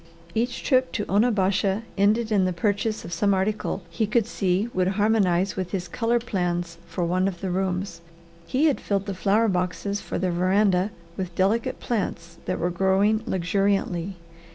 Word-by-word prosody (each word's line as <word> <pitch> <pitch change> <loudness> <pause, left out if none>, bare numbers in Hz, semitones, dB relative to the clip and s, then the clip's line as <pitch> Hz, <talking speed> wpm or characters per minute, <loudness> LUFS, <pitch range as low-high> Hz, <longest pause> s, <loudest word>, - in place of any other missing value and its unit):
Each 240 +2 -1
trip 255 -1 +2
to 210 - -1
Onabasha 200 -1 +2
ended 215 +3 +2
in 200 -3 +3
the 185 - 0
purchase 205 +4 -1
of 170 - -6
some 200 +4 +2
article 195 0 -1
he 170 +6 -1
could 220 0 +2
see 195 -2 0
would 185 -1 +1
harmonize 200 -4 +2
with 185 -2 -3
his 185 -2 -2
colour 230 +6 +1
plans 175 -6 -2
for 175 -1 -2
one 185 +2 +1
of 180 -3 -4
the 190 -1 -3
rooms. 185 -1 -2 0.5
He 275 +5 +2
had 295 -4 +2
filled 200 -1 -1
the 200 - -3
flower 205 +4 +2
boxes 190 +2 -1
for - - -4
the 185 -1 0
veranda 185 +2 +2 0.3
with 180 -2 -4
delicate 210 +5 +1
plants 170 -7 -3
that - - -1
were 175 +2 -1
growing 195 +4 +2
luxuriantly. 195 -1 0
195 Hz, 170 wpm, -25 LUFS, 180-215 Hz, 0.5 s, in